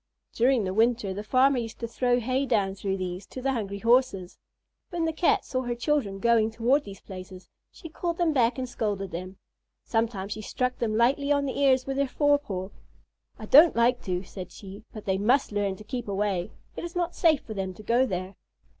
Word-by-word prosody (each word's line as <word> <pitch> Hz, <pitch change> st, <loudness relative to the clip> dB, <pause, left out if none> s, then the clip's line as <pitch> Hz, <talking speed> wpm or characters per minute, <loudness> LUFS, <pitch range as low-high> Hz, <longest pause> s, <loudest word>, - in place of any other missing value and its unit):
During 245 Hz, -1 st, +3 dB
the 185 Hz, -1 st, -2 dB
winter, 225 Hz, -2 st, +2 dB
the 205 Hz, +2 st, -5 dB
farmer 255 Hz, +4 st, +3 dB
used 225 Hz, -2 st, -6 dB
to 230 Hz, -, -2 dB
throw 245 Hz, +1 st, +1 dB
hay 260 Hz, +3 st, -1 dB
down 205 Hz, -6 st, +1 dB
through 195 Hz, 0 st, -3 dB
these 185 Hz, +1 st, -5 dB
to -, -, -8 dB
the 270 Hz, +1 st, 0 dB
hungry 200 Hz, -5 st, -3 dB
Horses. 230 Hz, -5 st, +1 dB, 0.5 s
When 340 Hz, -2 st, -1 dB
the 320 Hz, -, -1 dB
Cat 370 Hz, +5 st, +2 dB
saw 255 Hz, -, -2 dB
her 245 Hz, -1 st, -3 dB
children 240 Hz, -5 st, 0 dB
going 230 Hz, +1 st, +3 dB
toward 240 Hz, +6 st, +1 dB
these 195 Hz, -1 st, -9 dB
places, 185 Hz, -1 st, -10 dB, 0.2 s
she 335 Hz, -, -11 dB
called 340 Hz, +1 st, -3 dB
them 340 Hz, -3 st, +2 dB
back 245 Hz, -2 st, +2 dB
and 255 Hz, -1 st, -3 dB
scolded 205 Hz, -5 st, -3 dB
them. 185 Hz, +3 st, -6 dB, 0.5 s
Sometimes 225 Hz, -4 st, -1 dB
she 215 Hz, -, -4 dB
struck 250 Hz, +4 st, -2 dB
them 215 Hz, -2 st, 0 dB
lightly 275 Hz, +5 st, +2 dB
on 285 Hz, -1 st, +2 dB
the 270 Hz, -, -3 dB
ears 260 Hz, -2 st, +4 dB
with 270 Hz, 0 st, -3 dB
her 280 Hz, 0 st, +2 dB
forepaw. 280 Hz, -10 st, 0 dB, 0.7 s
"I 215 Hz, -, -8 dB
don't 305 Hz, +9 st, +7 dB
like 240 Hz, +2 st, +3 dB
to," 180 Hz, -1 st, -2 dB
said 185 Hz, -1 st, -9 dB
she, 200 Hz, +1 st, -11 dB
"but 215 Hz, -, -9 dB
they 190 Hz, -1 st, 0 dB
must 245 Hz, +6 st, +2 dB
learn 205 Hz, -2 st, -1 dB
to 215 Hz, -, -12 dB
keep 240 Hz, +1 st, -5 dB
away. 195 Hz, -3 st, -1 dB, 0.3 s
It -, -, -6 dB
is 345 Hz, 0 st, -6 dB
not 350 Hz, -1 st, -1 dB
safe 315 Hz, -4 st, +3 dB
for 220 Hz, -, -8 dB
them 190 Hz, -2 st, -4 dB
to 215 Hz, -, -12 dB
go 240 Hz, +4 st, +2 dB
there." 185 Hz, -1 st, -4 dB
230 Hz, 210 wpm, -27 LUFS, 195-265 Hz, 0.7 s, don't